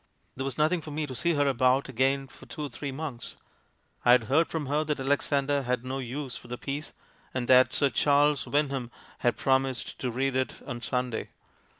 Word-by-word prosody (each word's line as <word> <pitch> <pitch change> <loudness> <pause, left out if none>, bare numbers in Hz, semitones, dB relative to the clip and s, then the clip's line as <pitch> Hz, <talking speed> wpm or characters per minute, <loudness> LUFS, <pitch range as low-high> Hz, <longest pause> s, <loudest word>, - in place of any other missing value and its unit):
"There 135 - -3
was 135 -2 -3
nothing 155 +3 +2
for 155 - -9
me 150 +1 -2
to 135 - -7
see 170 +7 +1
her 145 -1 +2
about 130 0 +3
again 135 +2 +1
for - - -15
two 150 - -6
or 145 - -3
three 140 +3 -5
months. 135 -4 -6 0.7
I 120 - +7
had 125 -2 +5
heard 150 +8 +3
from 160 -3 -3
her 145 +3 +1
that 150 -2 -2
Alexander 140 +1 +1
had 125 -1 -2
no 130 +1 -3
use 130 +1 -5
for - - -10
the 125 - -5
piece, 140 +3 -5 0.4
and 125 -2 -1
that 130 0 +6
'Sir 140 -2 +2
Charles 145 -1 +3
Wyndham 140 -4 0 0.3
had 120 - +1
promised 130 -2 0
to 125 - -1
read 130 +2 -1
it 130 0 -1
on 120 0 -5
Sunday.' 125 -1 -2
135 Hz, 205 wpm, -28 LUFS, 125-145 Hz, 0.7 s, I